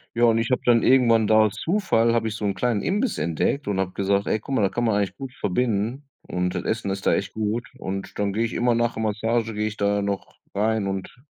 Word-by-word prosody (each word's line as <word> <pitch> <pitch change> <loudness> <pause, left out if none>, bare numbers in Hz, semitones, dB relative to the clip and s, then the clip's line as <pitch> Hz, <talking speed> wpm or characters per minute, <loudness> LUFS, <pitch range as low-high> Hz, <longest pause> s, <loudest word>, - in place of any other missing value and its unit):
Ja, 120 - +1
und 115 -1 +5
ich 115 - -1
habe 125 - +1
dann 120 -2 +5
irgendwann 115 -4 +4
da 110 - +4
aus 110 -2 +3
Zufall, 115 - +1
habe 115 -1 +1
ich 110 - -3
so 110 - -7
'n 100 -1 0
kleinen 120 -5 0
Imbiss 210 +7 -1
entdeckt 85 - -1
und 100 -2 -1
habe 95 -1 -1
gesagt: 100 +1 0
„Ey 110 - 0
guck 135 +5 -4
mal, 110 - +2
da 100 - +3
kann 120 +5 -2
man 110 -3 +2
eigentlich 100 -2 -1
gut 135 -2 -7
verbinden 115 +6 -1
und 90 0 -2
das - - -2
Essen 110 -2 -2
ist 95 0 -4
da - - +4
echt 95 - -2
gut.“ 110 +2 -2
Und 95 +1 -5
dann 100 -1 0
gehe 110 +3 0
ich 115 - -2
immer 120 0 +2
nach 120 0 +1
der 110 - -3
Massage, 110 +1 0
gehe 105 +1 -1
ich 110 0 -6
da 100 0 +1
noch 100 -1 -4 0.2
rein 110 0 +1
und 95 -1 -4
110 Hz, 260 wpm, -24 LUFS, 100-120 Hz, 0.2 s, und